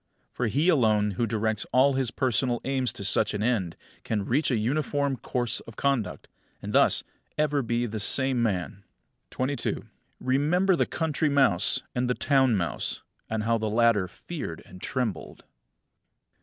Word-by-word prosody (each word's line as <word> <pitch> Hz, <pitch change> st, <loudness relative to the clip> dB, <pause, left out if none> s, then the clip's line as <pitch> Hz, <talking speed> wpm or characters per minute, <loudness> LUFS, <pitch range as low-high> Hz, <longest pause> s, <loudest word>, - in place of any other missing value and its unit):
For 125 Hz, -, -2 dB
he 145 Hz, +9 st, +1 dB
alone 110 Hz, -, +3 dB
who 115 Hz, +5 st, -1 dB
directs 110 Hz, -1 st, -1 dB
all 135 Hz, +2 st, +4 dB
his 130 Hz, -2 st, 0 dB
personal 125 Hz, 0 st, 0 dB
aims 130 Hz, -2 st, 0 dB
to -, -, -7 dB
such 100 Hz, +2 st, +1 dB
an 105 Hz, -, -2 dB
end 105 Hz, -8 st, 0 dB, 0.3 s
can 105 Hz, -3 st, -2 dB
reach 140 Hz, +8 st, +1 dB
a 125 Hz, -, +1 dB
uniform 140 Hz, +4 st, 0 dB
course 120 Hz, -1 st, -1 dB
of 115 Hz, -, -13 dB
conduct, 125 Hz, -9 st, -1 dB, 0.3 s
and -, -, -6 dB
thus -, -, +4 dB
be -, -, -42 dB, 0.3 s
ever 150 Hz, -2 st, +1 dB
the 120 Hz, -2 st, -2 dB
same 130 Hz, +4 st, +4 dB
man. 100 Hz, -2 st, -2 dB, 0.5 s
22. 130 Hz, -1 st, -2 dB, 0.3 s
Remember 155 Hz, +9 st, +2 dB
the -, -, +1 dB
country 160 Hz, -1 st, 0 dB
mouse 135 Hz, -11 st, +2 dB
and 125 Hz, 0 st, -1 dB
the 125 Hz, -, +1 dB
town 135 Hz, -4 st, +3 dB
mouse; 85 Hz, -4 st, -2 dB, 0.3 s
and 110 Hz, -1 st, -2 dB
how 115 Hz, +1 st, +1 dB
the 110 Hz, 0 st, -1 dB
latter 110 Hz, -3 st, +3 dB
feared -, -, -7 dB
and 90 Hz, 0 st, -14 dB
trembled. 115 Hz, -11 st, -4 dB
120 Hz, 155 wpm, -26 LUFS, 110-135 Hz, 0.5 s, all